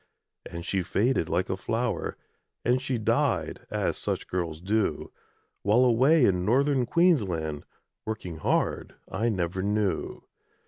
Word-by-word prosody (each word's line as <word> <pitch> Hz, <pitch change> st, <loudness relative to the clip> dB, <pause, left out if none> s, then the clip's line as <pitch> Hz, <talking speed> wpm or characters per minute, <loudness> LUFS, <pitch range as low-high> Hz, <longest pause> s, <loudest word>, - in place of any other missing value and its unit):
And 85 Hz, 0 st, -7 dB
she 95 Hz, -, 0 dB
faded 100 Hz, 0 st, +1 dB
like 90 Hz, +2 st, 0 dB
a -, -, -1 dB
flower, 115 Hz, +5 st, -2 dB, 0.5 s
And 125 Hz, +2 st, +2 dB
she 135 Hz, -2 st, -1 dB
died, 110 Hz, -, 0 dB
as -, -, -1 dB
such -, -, -2 dB
girls 85 Hz, -4 st, -3 dB
do, 100 Hz, -3 st, -1 dB, 0.5 s
While, 110 Hz, +6 st, +4 dB
away 130 Hz, +5 st, +5 dB
in 90 Hz, -2 st, +2 dB
Northern 130 Hz, +4 st, +2 dB
Queensland, 95 Hz, -, +1 dB, 0.4 s
Working 100 Hz, -7 st, -5 dB
hard, 80 Hz, -, -1 dB, 0.2 s
I 110 Hz, +5 st, 0 dB
never 90 Hz, -3 st, -1 dB
knew. 105 Hz, 0 st, -1 dB
105 Hz, 130 wpm, -27 LUFS, 90-125 Hz, 0.5 s, away